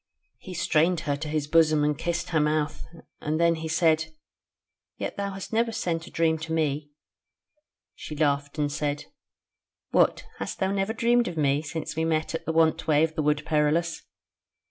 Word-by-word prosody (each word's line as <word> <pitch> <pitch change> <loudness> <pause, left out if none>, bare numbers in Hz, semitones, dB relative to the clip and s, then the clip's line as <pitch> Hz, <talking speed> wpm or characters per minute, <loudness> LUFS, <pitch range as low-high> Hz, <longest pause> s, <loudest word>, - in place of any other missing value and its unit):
He 185 - -9
strained 170 +1 +2
her 145 -1 -1
to 155 +2 -5
his 150 -1 -1
bosom 155 -1 +4
and 150 0 +2
kissed 170 +3 -2
her 160 - +2
mouth, 150 0 0 0.3
and 155 +1 -2
then 170 0 +4
he 160 0 -4
said: 160 0 +3 0.9
"Yet - - -4
thou 200 0 -2
hast 195 +3 -7
never 230 +1 +2
sent 175 -6 -2
a - - -9
dream 160 -1 +1
to 165 +1 -6
me." 150 -2 0 1.0
She 155 - -8
laughed 145 -1 0
and 145 -1 0
said: 145 0 -2 0.9
"What! - - +3
hast - - -4
thou 190 0 0
never 200 +2 0
dreamed 240 0 +2
of 175 -2 -5
me 145 -1 +2
since 155 0 -5
we 160 - 0
met 160 0 0
at 165 - -5
the - - +1
want 160 -1 +2
way 155 -1 +4
of 160 0 0
the 155 - -1
Wood 150 0 +1
Perilous?" 160 +2 +1
160 Hz, 185 wpm, -26 LUFS, 150-170 Hz, 1.0 s, bosom